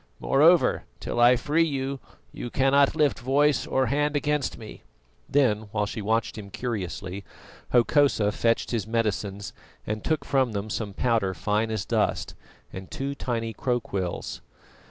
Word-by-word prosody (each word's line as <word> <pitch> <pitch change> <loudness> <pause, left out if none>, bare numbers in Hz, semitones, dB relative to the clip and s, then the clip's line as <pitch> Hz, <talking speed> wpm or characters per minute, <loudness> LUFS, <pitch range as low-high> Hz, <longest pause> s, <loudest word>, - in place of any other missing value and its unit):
Moreover, 160 +5 +4
till - - -3
I 120 +1 +7
free 150 +6 +1
you, 135 -3 -2 0.3
you 120 - -6
cannot 135 +3 +3
lift 150 -3 +2
voice 140 +3 +2
or 130 0 +1
hand 145 +4 0
against 145 -1 0
me." 110 -2 -10 0.5
Then, 110 -7 +2
while 105 -1 0
she 105 +2 -5
watched 110 +1 -1
him 100 -2 -9
curiously, 100 - -4 0.5
Hokosa 120 -4 +3
fetched 115 +2 0
his 110 -4 -2
medicines 105 -3 -2 0.3
and 105 0 -3
took 155 -2 -1
from 130 -4 +1
them 100 +1 -4
some 100 -3 -4
powder 110 -6 +1
fine 105 +3 0
as 110 -4 -2
dust - - 0 0.4
and 95 0 -8
two 140 +1 -3
tiny 115 -4 -3
crowquills. 100 - -3
115 Hz, 145 wpm, -26 LUFS, 105-140 Hz, 0.5 s, I